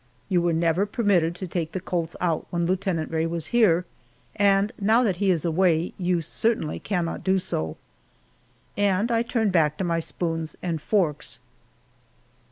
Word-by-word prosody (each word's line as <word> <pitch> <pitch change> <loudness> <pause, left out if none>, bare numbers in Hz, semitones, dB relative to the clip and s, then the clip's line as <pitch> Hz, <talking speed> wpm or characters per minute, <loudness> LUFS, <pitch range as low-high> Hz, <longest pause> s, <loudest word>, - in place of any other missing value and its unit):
You 180 -3 +3
were 170 0 +1
never 165 +4 +1
permitted 195 -7 +1
to 185 +1 -6
take 170 -2 -3
the 185 - -2
colts 170 -2 -3
out 170 -3 -1
when 170 -1 -1
Lieutenant 180 -3 -1
Rae 160 0 0
was 165 -1 -4
here, 180 -7 +4 0.5
and 200 0 +3
now 220 +5 +4
that 195 -7 +1
he 200 +1 +1
is 175 -4 +1
away, 170 0 +2
you 180 -1 +1
certainly 170 0 -1
cannot 175 -5 -2
do 190 +1 +2
so." 80 - -3 1.0
And 205 +3 +1
I 230 0 +3
turned 230 -3 0
back 155 -4 +2
to - - -2
my 170 -2 0
spoons 165 -1 -3
and 165 -4 -2
forks. 150 - -1
175 Hz, 165 wpm, -25 LUFS, 165-195 Hz, 1.0 s, here